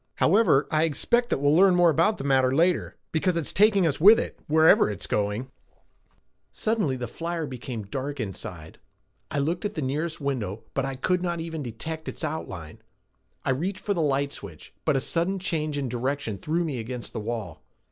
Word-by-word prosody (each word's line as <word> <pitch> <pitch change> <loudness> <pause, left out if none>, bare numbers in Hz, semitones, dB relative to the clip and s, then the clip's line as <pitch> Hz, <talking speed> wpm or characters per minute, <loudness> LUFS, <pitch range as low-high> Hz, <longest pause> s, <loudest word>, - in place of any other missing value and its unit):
However, 175 -7 +4
I 155 - +2
expect 235 - +1
that - - +1
we'll 145 +1 +3
learn 185 +1 +6
more 175 -1 +5
about 165 +8 +2
the - - -6
matter 130 -1 +3
later 175 +3 +2 0.2
because 170 +2 +1
it's 165 - -2
taking 200 -2 +4
us 155 -1 0
with 215 +6 +9
it, - - -5
wherever 160 -6 +5
it's 100 -4 -4
going." 105 +5 -1 1.0
Suddenly 215 -12 0
the 125 -1 -4
flyer 165 +5 -4
became 125 -4 -6
dark 135 +7 -5
inside. 90 -6 -6 0.5
I - - -3
looked 160 +7 -1
at 205 0 -3
the 155 - -2
nearest 155 +5 -2
window, 115 -8 -3
but 135 - 0
I 135 0 -3
could 180 +7 0
not 175 -2 -2
even 165 -1 -4
detect 160 +6 -5
its - - -8
outline. 95 - -5 0.6
I - - +2
reached 180 +9 -2
for 205 - +1
the 170 - -1
light 140 -1 +1
switch, - - -10
but 155 - +3
a - - +3
sudden 170 +7 0
change 155 -5 -2
in 140 -2 -1
direction 125 -3 -2
threw 165 +3 0
me 145 -7 -3
against 120 +1 -6
the - - -3
wall. 110 0 -5
150 Hz, 190 wpm, -26 LUFS, 130-170 Hz, 1.0 s, with